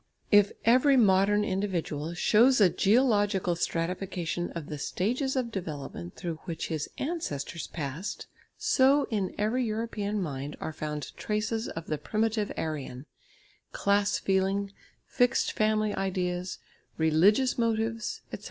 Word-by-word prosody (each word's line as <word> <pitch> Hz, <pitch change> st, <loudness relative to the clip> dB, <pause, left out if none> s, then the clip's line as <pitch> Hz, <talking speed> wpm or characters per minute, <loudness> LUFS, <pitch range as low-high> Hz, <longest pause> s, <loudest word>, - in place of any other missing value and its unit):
If 205 Hz, -1 st, +6 dB
every 255 Hz, +4 st, +5 dB
modern 205 Hz, -1 st, +4 dB
individual 175 Hz, -5 st, -2 dB
shows 235 Hz, +8 st, +4 dB
a 190 Hz, -4 st, +6 dB
geological 205 Hz, -5 st, +2 dB
stratification 175 Hz, 0 st, -2 dB
of 165 Hz, -3 st, -5 dB
the 150 Hz, 0 st, -6 dB
stages 250 Hz, -, -1 dB
of 250 Hz, -3 st, -1 dB
development 145 Hz, -, -6 dB
through 165 Hz, -3 st, -5 dB
which 165 Hz, -2 st, -4 dB
his 155 Hz, -3 st, -3 dB
ancestors 170 Hz, -, -3 dB
passed, 150 Hz, +4 st, -5 dB, 0.3 s
so 275 Hz, +2 st, +4 dB
in 200 Hz, -4 st, -1 dB
every 225 Hz, +5 st, +1 dB
European 215 Hz, -2 st, -2 dB
mind 145 Hz, -4 st, -4 dB
are 160 Hz, -, -4 dB
found 150 Hz, -1 st, -5 dB
traces 220 Hz, +2 st, -2 dB
of 165 Hz, 0 st, -6 dB
the 155 Hz, -2 st, -3 dB
primitive 215 Hz, +5 st, -1 dB
Aryan, 145 Hz, -4 st, -4 dB, 0.7 s
class 200 Hz, 0 st, +2 dB
feeling, 195 Hz, +1 st, 0 dB, 0.3 s
fixed 245 Hz, 0 st, +2 dB
family 215 Hz, 0 st, +1 dB
ideas, 180 Hz, -1 st, -2 dB, 0.4 s
religious 190 Hz, +12 st, +3 dB
motives, 225 Hz, -1 st, -1 dB
etc. -, -, -4 dB
195 Hz, 125 wpm, -28 LUFS, 165-220 Hz, 0.7 s, If